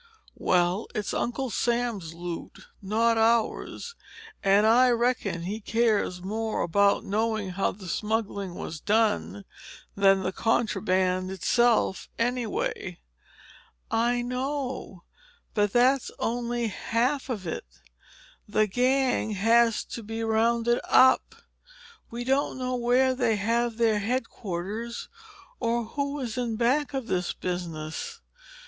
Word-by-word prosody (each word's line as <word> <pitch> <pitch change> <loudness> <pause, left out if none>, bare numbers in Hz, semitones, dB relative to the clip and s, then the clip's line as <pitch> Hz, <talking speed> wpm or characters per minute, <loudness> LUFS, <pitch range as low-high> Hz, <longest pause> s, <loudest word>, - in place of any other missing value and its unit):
"Well, 180 +3 +1
it's 210 -2 -2
Uncle 250 +1 -2
Sam's 230 -8 -1
loot, 175 0 -7 0.2
not 225 +3 +2
ours. 230 - 0 0.5
And 200 +1 +4
I 245 +3 +6
reckon 235 -7 0
he 205 +5 -3
cares 210 -5 +1
more 220 +3 -2
about 200 +4 +3
knowing 215 -1 -1
how 195 +2 0
the 190 -1 -11
smuggling 205 -2 -2
was 160 - -6
done 210 0 0 0.5
than 195 -1 +4
the 185 - -1
contraband 185 -4 +1
itself, 225 +2 +1
anyway." 230 -6 -2 0.9
"I 240 +1 +1
know. 255 -6 -4 0.5
But 205 -2 +2
that's 255 +3 +3
only 240 0 -1
half 250 +7 -1
of 210 -7 -3
it. 160 - -4 0.8
The 215 +1 +3
gang 255 +2 +1
has 230 +3 +3
got - - -22
to 235 - -4
be 225 +1 -5
rounded 230 +2 +2
up. 260 0 +5 0.7
We 235 +1 -5
don't 270 +2 0
know 255 0 -2
where 250 +2 +3
they 245 -4 +1
have 230 +2 0
their 225 -3 +3
headquarters 220 -1 -4 0.5
or 235 0 0
who 280 +4 -3
is 250 -2 -4
in 235 -2 -1
back 265 +5 +1
of 265 -3 -2
this 180 -5 -1
business. 175 - -5
225 Hz, 120 wpm, -27 LUFS, 195-245 Hz, 0.9 s, I